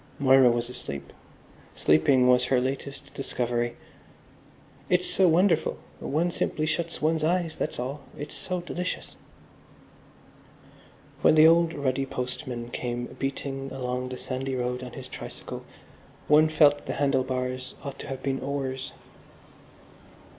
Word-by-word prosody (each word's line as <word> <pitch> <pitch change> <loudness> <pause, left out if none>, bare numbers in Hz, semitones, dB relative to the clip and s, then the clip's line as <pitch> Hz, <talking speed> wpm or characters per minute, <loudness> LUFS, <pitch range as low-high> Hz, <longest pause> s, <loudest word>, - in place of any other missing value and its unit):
Moira 135 -2 +6
was 120 0 0
asleep. 70 - -6 0.6
Sleeping 125 - +4
was 125 0 +5
her 130 0 +3
latest 135 +2 -4
discovery. 120 -3 -2 1.1
"It's 180 0 +3
so 190 - +3
wonderful. 175 +3 +3 0.2
One 165 +5 0
simply 155 -2 -1
shuts 165 +1 -2
one's 160 0 +2
eyes, 170 0 +1
that's - - -3
all. 135 +4 -4 0.2
It's 150 +1 -6
so 185 -2 -3
delicious." 180 +1 -4 2.1
When - - +6
the 155 0 +8
old 165 0 +5
ruddy 135 -1 0
postman 125 -2 -4
came 120 0 -4
beating 135 0 -3
along 125 -1 -3
the 130 - -5
sandy 130 +1 -3
road 125 0 -2
on 125 -1 -8
his - - -8
tricycle - - -7 0.6
one 155 +1 +6
felt 145 -2 +4
the - - -1
handle 135 -2 +2
bars 130 0 -3
ought 140 -1 -6
to - - -7
have 135 -1 -6
been 135 -1 0
oars. 135 -1 -3
135 Hz, 130 wpm, -27 LUFS, 125-155 Hz, 2.1 s, the